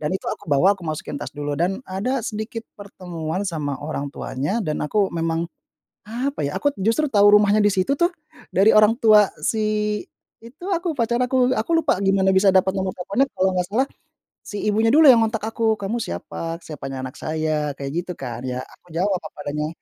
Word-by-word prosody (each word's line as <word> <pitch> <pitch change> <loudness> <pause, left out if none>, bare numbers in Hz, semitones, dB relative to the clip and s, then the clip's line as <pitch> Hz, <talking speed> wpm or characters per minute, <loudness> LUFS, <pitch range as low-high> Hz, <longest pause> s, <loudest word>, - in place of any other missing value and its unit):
dan 150 0 -2
itu - - -4
aku - - -6
bawa 145 +5 +4
aku - - -15
masukin 155 -2 -4
tas - - -7
dulu. 145 0 -3
Dan 185 +7 0
ada 230 +8 -1
sedikit 220 +1 -5 0.2
pertemuan 180 -3 -5
sama 150 -4 -3
orang 145 -1 -3
tuanya 145 - -2
dan 155 -4 -2
aku 200 +5 +1
memang, 165 0 -1 0.6
apa 260 +5 -3
ya, 145 - -4
aku 290 - +1
justru 225 +10 +2
tahu 205 -1 +6
rumahnya 210 0 +4
di 205 - +5
situ 195 +6 +1
tuh 345 - +4 0.5
dari 200 +4 +5
orang 215 +1 +6
tua 210 -2 +6
si 215 -1 0 0.4
itu 240 +9 -13
aku, 340 -2 -1
pacar 235 -1 +1
aku. 255 0 +2
Aku 220 +9 -3
lupa 310 - +2
gimana 195 -1 +3
bisa 190 +1 +4
dapat 190 0 +4
nomor 190 -1 -1
teleponnya, 200 +9 0
kalau 190 0 +2
nggak 180 - 0
salah 240 +7 +1 0.6
si 205 - -7
ibunya 215 +2 +2
dulu 315 +2 +7
yang 235 - +5
ngontak 225 -1 -1
aku. 225 0 +1
"Kamu 200 +4 -3
siapa? 165 - -5
Siapanya 135 -3 -6
anak 130 - -7
saya?" 155 -2 -2
Kayak 140 -1 -5
gitu 180 - -7
kan, 120 -3 -6
ya 125 0 -3
aku - - -19
jawab 190 +1 +1
apa 155 - -11
adanya. 150 +1 -2
195 Hz, 195 wpm, -22 LUFS, 160-225 Hz, 0.6 s, dulu